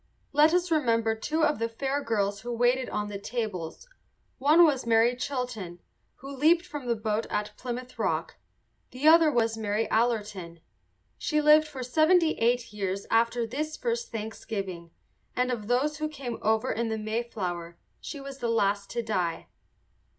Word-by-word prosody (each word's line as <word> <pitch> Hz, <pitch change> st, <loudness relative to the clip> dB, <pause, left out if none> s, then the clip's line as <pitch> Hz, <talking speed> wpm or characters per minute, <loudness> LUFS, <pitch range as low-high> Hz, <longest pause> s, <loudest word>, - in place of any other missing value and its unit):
Let 300 Hz, +2 st, +6 dB
us 355 Hz, 0 st, +1 dB
remember 230 Hz, -7 st, +2 dB
two 305 Hz, +8 st, -1 dB
of 300 Hz, -4 st, +2 dB
the 230 Hz, 0 st, -1 dB
fair 275 Hz, +5 st, -2 dB
girls 205 Hz, -2 st, -1 dB
who 240 Hz, +2 st, -5 dB
waited 245 Hz, +2 st, +1 dB
on 210 Hz, 0 st, -2 dB
the 205 Hz, -1 st, -6 dB
tables. 205 Hz, -, -4 dB, 0.5 s
One 305 Hz, +5 st, +6 dB
was 280 Hz, -5 st, +1 dB
Mary 230 Hz, +2 st, +4 dB
Chilton, 245 Hz, -9 st, -4 dB, 0.4 s
who 275 Hz, +1 st, -9 dB
leaped 330 Hz, +6 st, +4 dB
from 295 Hz, -7 st, -7 dB
the 235 Hz, -, +2 dB
boat 215 Hz, 0 st, -2 dB
at 210 Hz, 0 st, -3 dB
Plymouth 250 Hz, 0 st, -6 dB
Rock; -, -, -1 dB, 0.5 s
the 265 Hz, +4 st, -1 dB
other 320 Hz, -1 st, +7 dB
was 225 Hz, -3 st, +1 dB
Mary 215 Hz, +1 st, -1 dB
Allerton. 210 Hz, -7 st, -1 dB, 0.6 s
She 305 Hz, -, 0 dB
lived 300 Hz, +1 st, +6 dB
for 270 Hz, -4 st, -6 dB
seventy 315 Hz, +6 st, +4 dB
eight 235 Hz, -1 st, +1 dB
years 195 Hz, -1 st, -3 dB
after 230 Hz, +1 st, +2 dB
this 300 Hz, +7 st, -4 dB
first 470 Hz, 0 st, -2 dB
Thanksgiving, 200 Hz, -5 st, -5 dB, 0.5 s
and 250 Hz, 0 st, +1 dB
of 215 Hz, -4 st, -4 dB
those 275 Hz, +5 st, +1 dB
who 310 Hz, 0 st, -1 dB
came 265 Hz, -6 st, -6 dB
over 220 Hz, +1 st, +1 dB
in 230 Hz, 0 st, -1 dB
the 220 Hz, -, -2 dB
Mayflower 210 Hz, -6 st, -4 dB, 0.2 s
she 290 Hz, -, -7 dB
was 275 Hz, 0 st, -8 dB
the 235 Hz, -, -1 dB
last 200 Hz, -3 st, +1 dB
to 235 Hz, -, -3 dB
die. 180 Hz, -7 st, -2 dB
235 Hz, 165 wpm, -28 LUFS, 215-280 Hz, 0.6 s, other